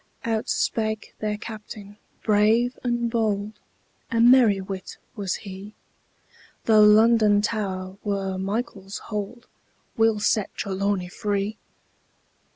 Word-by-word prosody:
Out 225 -1 -1
spake 220 -1 -1
their 210 -1 -2
Captain 210 -1 -9 0.3
brave 220 +4 +3
and 240 -1 -1
bold: 215 -2 -1 0.5
A 230 - 0
merry 235 -4 +6
wight 190 -1 -7 0.2
was 200 -4 -2
he: 195 +1 -9 0.9
Though 215 -2 +6
London 210 -1 +5
Tower 190 -3 -3
were 195 -2 -2
Michael's 195 -1 -4
hold, 215 +3 -6 0.5
We'll 225 -1 +3
set 210 -1 +1
Trelawny 195 -1 -1
free! 205 +3 -3
210 Hz, 105 wpm, -24 LUFS, 200-225 Hz, 0.9 s, merry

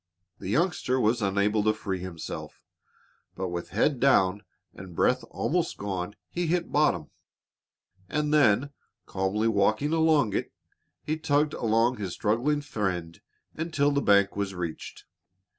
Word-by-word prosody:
The - - -6
youngster 135 - +1
was 115 0 +2
unable 100 +2 +1
to 110 0 +2
free 95 -3 -4
himself, 90 -3 -7 0.8
but 95 -1 -3
with 85 0 -5
head 120 - +1
down 105 -7 +3 0.3
and 95 -3 -11
breath 125 +8 +2
almost 170 0 -1
gone, 95 -1 -4 0.2
he 175 -1 -2
hit 170 +1 0
bottom, 145 - +1 1.0
and 150 0 0
then, 140 -1 +4 0.3
calmly 95 +4 -1
walking 110 +7 +2
along 155 -9 +3
it, - - -2 0.5
he 155 +1 -2
tugged 150 -1 +1
along 115 +2 +1
his 95 -4 -4
struggling 125 +8 0
friend 90 - -3 0.3
until 155 -3 0
the 140 0 +1
bank 100 -3 +4
was 100 -1 -3
reached. 85 -3 -6
110 Hz, 135 wpm, -27 LUFS, 95-145 Hz, 1.0 s, then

